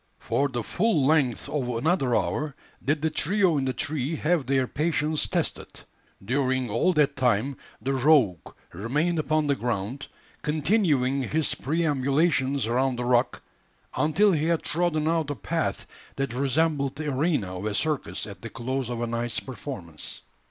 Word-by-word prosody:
For 140 +1 0
the 120 -3 -3
full 180 - +1
length 140 -5 +2
of 135 -5 -2
another 125 +1 +1
hour 150 -2 -1 0.3
did 150 +2 0
the 160 - +1
trio 180 -1 +2
in 135 - -1
the 130 - +1
tree 150 +3 -1
have 155 -3 0
their 135 -1 +2
patience 155 +2 0
tested. - - -2 0.6
During 130 0 0
all 115 - +3
that 150 -3 +2
time 125 +2 +1 0.2
the 135 +5 -1
"rogue" 130 - +3 0.2
remained 150 - 0
upon 155 +1 +1
the 140 -1 +2
ground, 120 +2 -3 0.3
continuing 150 - +1
his 155 0 +1
perambulations 140 -2 +1
around 125 +3 +1
the 120 0 -3
rock 125 0 +1 0.5
until 195 +7 +3
he 155 -3 +1
had 165 -1 +1
trodden 155 -1 0
out 160 -2 +1
a 145 - -2
path - - -2 0.3
that 135 -3 -2
resembled 140 +1 +1
the 150 0 -3
arena 130 - 0
of 100 - -5
a 105 - -2
circus 155 +1 -1
at 100 -2 -10
the 115 - -6
close 125 +2 -3
of 120 -1 -3
a - - 0
night's 115 0 -2
performance. 95 - -8
140 Hz, 160 wpm, -26 LUFS, 125-155 Hz, 0.6 s, all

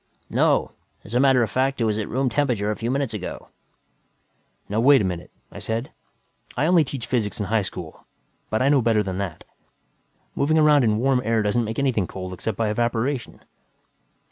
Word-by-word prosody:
"No. - - +2 0.3
As 105 - -11
a 125 - +3
matter 135 -2 +4
of 110 - -3
fact, 135 +1 0
it - - +1
was 110 -1 0
at 105 - -4
room 130 +2 0
temperature 120 -5 0
a - - -2
few 115 +2 -3
minutes 135 -2 -1
ago." 100 -4 -6 1.2
"Now 105 +2 -1
wait 135 +3 +6
a - - 0
minute," 90 -2 -4 0.2
I - - -9
said. 115 +3 -3 0.7
"I 140 - +2
only 170 -1 +5
teach 130 -4 -5
physics 115 -5 -1
in 105 - -1
high 110 +1 +1
school, 90 -4 -8 0.4
but 110 +3 0
I 135 - +3
know 140 -2 +4
better 110 -2 +2
than 95 -1 -4
that. 95 -6 -5 0.9
Moving 155 +3 +1
around 150 -3 +5
in 110 -2 +2
warm 130 +2 +2
air 115 -1 +1
doesn't 115 +3 +1
make 110 +1 -5
anything 125 -9 +1
cold 95 -1 -7
except 100 +2 -4
by 115 -2 0
evaporation." 120 +3 -2
115 Hz, 195 wpm, -23 LUFS, 105-135 Hz, 1.2 s, wait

